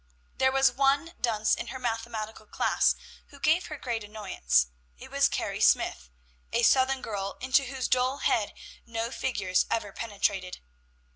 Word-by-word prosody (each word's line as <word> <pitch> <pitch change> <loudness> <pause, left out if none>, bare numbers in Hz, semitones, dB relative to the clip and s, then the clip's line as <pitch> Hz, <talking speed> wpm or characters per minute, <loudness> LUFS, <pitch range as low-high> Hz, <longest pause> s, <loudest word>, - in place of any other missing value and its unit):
There 265 0 +4
was 270 0 +4
one 280 +5 +2
dunce 220 -2 +2
in - - -2
her 260 - -5
mathematical 225 -3 -4
class - - +2 0.3
who 280 - -16
gave 315 +5 +2
her 305 - -6
great 235 -5 -3
annoyance; 195 - +1 0.3
it - - -12
was - - +3
Carrie - - -3
Smyth, 60 -1 +2 0.4
a 235 - +1
Southern 260 +2 +4
girl, 200 -2 -4
into 260 +2 +2
whose 260 -1 -3
dull 255 +2 +2
head 215 -6 0 0.3
no 230 0 -3
figures 195 -10 0
ever 205 -3 -2
penetrated. 200 -4 -2
230 Hz, 150 wpm, -28 LUFS, 210-265 Hz, 0.4 s, There